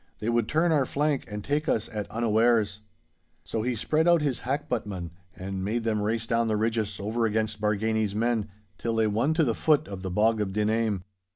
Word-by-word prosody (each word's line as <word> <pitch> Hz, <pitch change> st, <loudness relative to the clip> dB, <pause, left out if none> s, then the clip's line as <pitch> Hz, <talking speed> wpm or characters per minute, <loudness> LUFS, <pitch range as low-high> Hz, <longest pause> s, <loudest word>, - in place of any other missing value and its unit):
They 110 Hz, -, -3 dB
would 120 Hz, -2 st, +1 dB
turn 165 Hz, +2 st, +2 dB
our 140 Hz, -5 st, +2 dB
flank 145 Hz, -1 st, 0 dB
and 105 Hz, 0 st, -6 dB
take 150 Hz, +2 st, -1 dB
us 110 Hz, -, +1 dB
at 105 Hz, -2 st, -4 dB
unawares!' 110 Hz, -2 st, +2 dB, 0.6 s
So 100 Hz, +6 st, -3 dB
he 125 Hz, +2 st, -1 dB
spread 155 Hz, +9 st, +1 dB
out 170 Hz, -3 st, +5 dB
his 140 Hz, -4 st, 0 dB
hackbuttmen, 120 Hz, -, -3 dB, 0.2 s
and 95 Hz, 0 st, -5 dB
made 115 Hz, +4 st, -1 dB
them 110 Hz, -2 st, 0 dB
race 110 Hz, +2 st, -1 dB
down 115 Hz, 0 st, +1 dB
the 110 Hz, -1 st, +1 dB
ridges 110 Hz, -2 st, -1 dB
over 110 Hz, +3 st, 0 dB
against 110 Hz, 0 st, -1 dB
Bargany's 105 Hz, 0 st, 0 dB
men, 115 Hz, -1 st, 0 dB, 0.3 s
till 115 Hz, -1 st, -1 dB
they 110 Hz, -1 st, +3 dB
won 115 Hz, +9 st, +1 dB
to 160 Hz, -, +3 dB
the 120 Hz, -6 st, +1 dB
foot 155 Hz, +4 st, +2 dB
of 95 Hz, -2 st, -7 dB
the 95 Hz, -, -4 dB
Bog 110 Hz, +4 st, +2 dB
of 95 Hz, -2 st, -2 dB
Dinhame. 105 Hz, -2 st, 0 dB
110 Hz, 200 wpm, -27 LUFS, 105-120 Hz, 0.6 s, out